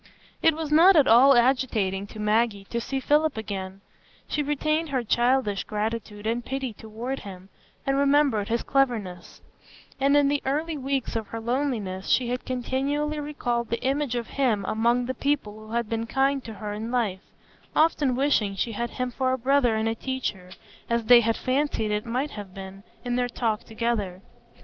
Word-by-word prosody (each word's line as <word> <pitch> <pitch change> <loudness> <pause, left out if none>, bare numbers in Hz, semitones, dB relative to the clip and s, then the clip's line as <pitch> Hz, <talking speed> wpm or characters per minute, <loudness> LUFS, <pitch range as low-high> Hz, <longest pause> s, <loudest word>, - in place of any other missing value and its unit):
It 325 -1 +4
was 315 -2 -4
not 345 +5 +7
at 295 -4 +5
all 260 +5 +7
agitating 230 -6 +1
to 215 - -11
Maggie 210 -1 +1
to 235 - -1
see 270 +3 -3
Philip 295 +1 +2
again; 195 -3 -5 0.5
she 300 - -1
retained 305 +2 0
her 260 -3 -1
childish 240 -3 +1
gratitude 215 0 -4
and 235 +2 -1
pity 265 -1 -4
toward 225 +6 -6
him, 190 -1 -10 0.4
and 275 - +1
remembered 275 -6 +3
his 235 +1 -1
cleverness; 220 -11 -1 0.6
and 280 +2 +4
in 290 -1 +4
the 285 0 +1
early 310 +4 -1
weeks 270 -3 -2
of 220 -2 -2
her 230 - -6
loneliness 225 -6 -2
she 245 -2 +2
had 250 +1 -3
continually 275 +4 -1
recalled 245 -6 -2
the 235 - -3
image 270 -1 0
of 235 -1 -2 0.2
him 215 -7 +2
among 235 +3 +1
the 260 - -2
people 215 -6 -2
who 220 - -9
had 235 -1 0
been 230 +1 -3
kind 270 +2 +1
to 225 -2 -7
her 205 0 -5
in 220 +2 -5
life, 220 -7 -1 0.5
often 300 -5 +3
wishing 245 -7 +1
she 230 +4 -1
had 235 +2 -3
him 250 +1 -3
for 260 +1 0
a - - 0
brother 255 -2 +2
and 220 0 0
a 225 - +1
teacher, 225 -7 -4 0.4
as 235 0 +1
they 245 +1 +8
had 225 0 0
fancied 255 -5 0
it 210 +2 -2
might 255 +5 -1
have 200 -3 -9
been, 195 0 -9 0.2
in 245 0 -1
their 245 0 0
talk 225 -3 -2
together. 220 -5 -2
240 Hz, 185 wpm, -25 LUFS, 215-275 Hz, 0.6 s, they